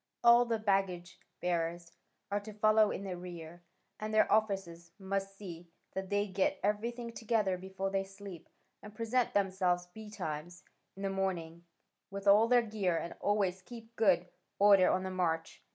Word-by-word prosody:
All 240 +1 +7
the 230 -1 0
baggage 195 -4 -1 0.2
bearers 170 -1 -2 0.4
are 205 - +1
to 210 +1 -10
follow 215 0 +4
in 200 - -4
the 190 -2 -4
rear: 175 -1 -9 0.4
and 215 0 -4
their 215 0 +3
officers 195 -6 0
must 195 0 -3
see 175 -4 -9 0.2
that 190 0 -4
they 205 0 +1
get 190 0 0
everything 235 +4 -1
together 215 -5 0
before 190 +1 -4
they 195 0 0
sleep, 195 -3 -11 0.3
and 210 0 -12
present 230 +2 0
themselves 185 -3 +1
betimes 180 -4 -7 0.3
in 195 - -8
the 195 - 0
morning, 175 -3 -3 0.4
with 200 0 -7
all 205 +3 +6
their 245 0 +5
gear, 205 -6 -1
and 170 - -4
always 195 -3 0
keep 230 +2 -12
good 185 -6 +3 0.3
order 200 -2 +6
on 185 - +1
the 190 - -4
march. 165 -3 -2
195 Hz, 160 wpm, -33 LUFS, 180-210 Hz, 0.4 s, All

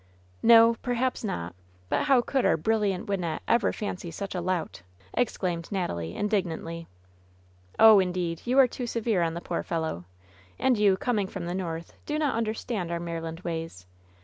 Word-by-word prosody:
"No, 230 0 +7
perhaps 250 0 -1
not; 85 - -3 0.3
but - - 0
how 270 -4 +5
could 265 +1 0
our - - +3
brilliant 205 +2 0
Wyn 200 -2 -1
nette 165 -2 -3
ever 235 -1 +3
fancy 185 -4 -5
such 195 +4 -5
a 180 - -2
lout 175 - -2 0.2
!'* 95 -1 -28
exclaimed 180 -8 -1
Natalie, 85 - -3
indig 210 -2 +1
nantly. 165 0 -6 0.9
"Oh, 220 -2 +9
indeed, 180 -3 -1
you 250 +2 +1
are 270 -2 +8
too 245 0 -5
severe 230 -5 0
on 165 -1 0
the 170 - -5
poor - - -3
fellow! 160 - -3 0.5
And 260 - +3
you, 205 -3 +3
coming 210 -3 0
from 190 -2 -6
the 175 - -3
North, 170 -3 -4
do 300 - -1
not 300 -3 +1
understand 220 -4 -2
our 170 - -1
Maryland 165 0 -5
ways. 165 - -5
190 Hz, 175 wpm, -27 LUFS, 165-230 Hz, 0.9 s, Oh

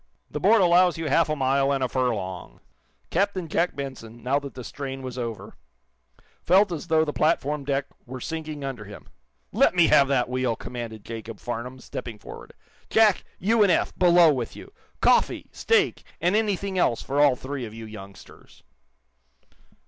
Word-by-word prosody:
"The - - -3
board 225 -2 +5
allows 175 -1 +4
you 160 -2 -3
half 160 +3 +3
a 155 - 0
mile 135 0 +1
and 135 -1 0
a - - +1
furlong." 110 -8 -3 0.5
Captain 190 -1 0
Jack 170 +3 0
Benson, 120 -5 -8
now 135 +3 +1
that 140 -1 -9
the 125 - -7
strain 135 +1 -6
was 130 -1 -6
over, 115 -3 -5 0.9
felt 190 +2 +4
as 170 0 -5
though 160 -1 +3
the 150 - -3
platform 150 -2 0
deck 140 0 -1 0.2
were 130 +1 -7
sinking 155 0 -5
under 130 -6 -5
him. 100 +1 -12 0.4
"Let - - +3
me 175 -2 +6
have 140 - +6
that 130 -3 +1
wheel," 125 -2 -1
commanded 115 -3 -7
Jacob 115 -1 -7
Farnum, 120 +1 -5
stepping 120 -2 -7
forward. - - -11 0.4
"Jack, 220 -3 +4
you 220 +4 +2
and 200 -3 +5
Eph, - - +1
below 175 -3 +5
with 125 -4 -4
you! 400 - -12 0.3
Coffee, - - +3
steak 450 -3 +1 0.2
and 180 +4 +1
anything 200 -3 0
else 120 -9 +1
for 140 +2 0
all 145 -3 +5
three 135 +1 -6
of 110 - -9
you 115 0 -8
youngsters!" 100 -3 -13
140 Hz, 170 wpm, -25 LUFS, 120-170 Hz, 0.9 s, me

